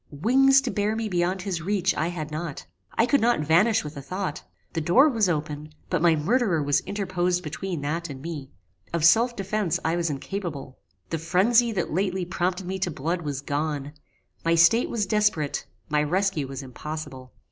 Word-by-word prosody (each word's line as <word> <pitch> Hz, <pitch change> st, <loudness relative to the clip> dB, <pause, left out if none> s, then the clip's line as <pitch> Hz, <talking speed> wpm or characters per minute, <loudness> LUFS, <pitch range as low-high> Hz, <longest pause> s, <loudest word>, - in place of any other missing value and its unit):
Wings 265 Hz, -, +4 dB
to 265 Hz, -, -3 dB
bear 210 Hz, +1 st, 0 dB
me 225 Hz, 0 st, -2 dB
beyond 180 Hz, 0 st, 0 dB
his 185 Hz, -4 st, -3 dB
reach 185 Hz, 0 st, +1 dB
I 160 Hz, -, -1 dB
had 160 Hz, -3 st, -5 dB
not. 155 Hz, -1 st, -5 dB, 0.3 s
I 230 Hz, -, +4 dB
could 275 Hz, +3 st, +2 dB
not 235 Hz, -5 st, +3 dB
vanish 185 Hz, +9 st, +3 dB
with 150 Hz, 0 st, -7 dB
a 140 Hz, -, -6 dB
thought. 185 Hz, +2 st, -4 dB, 0.3 s
The 165 Hz, -, -1 dB
door 210 Hz, -, +5 dB
was 225 Hz, -9 st, +2 dB
open, 155 Hz, -1 st, -3 dB, 0.2 s
but 180 Hz, -4 st, +1 dB
my 170 Hz, -1 st, +5 dB
murderer 175 Hz, -, +1 dB
was 145 Hz, 0 st, +2 dB
interposed 180 Hz, -3 st, -1 dB
between 170 Hz, +1 st, -4 dB
that 165 Hz, +4 st, -3 dB
and 135 Hz, -2 st, -7 dB
me. 150 Hz, -2 st, -6 dB, 0.4 s
Of 165 Hz, -2 st, +2 dB
self 235 Hz, +7 st, +5 dB
defence 195 Hz, -3 st, -1 dB
I 165 Hz, +1 st, +2 dB
was 170 Hz, -1 st, 0 dB
incapable. 145 Hz, -3 st, -5 dB, 0.3 s
The 165 Hz, -, -1 dB
phrenzy 210 Hz, +9 st, +3 dB
that 180 Hz, -6 st, -2 dB
lately 185 Hz, 0 st, 0 dB
prompted 180 Hz, +1 st, -2 dB
me 190 Hz, +1 st, -3 dB
to 185 Hz, -, 0 dB
blood 165 Hz, +4 st, -2 dB
was 145 Hz, -4 st, -4 dB
gone; 145 Hz, 0 st, -3 dB, 0.5 s
my 165 Hz, 0 st, +3 dB
state 170 Hz, +8 st, +5 dB
was 215 Hz, -3 st, -1 dB
desperate; 210 Hz, -8 st, 0 dB, 0.2 s
my 150 Hz, -1 st, +1 dB
rescue 165 Hz, -1 st, 0 dB
was 135 Hz, +1 st, -6 dB
impossible. 135 Hz, -1 st, -7 dB
175 Hz, 185 wpm, -25 LUFS, 150-200 Hz, 0.5 s, door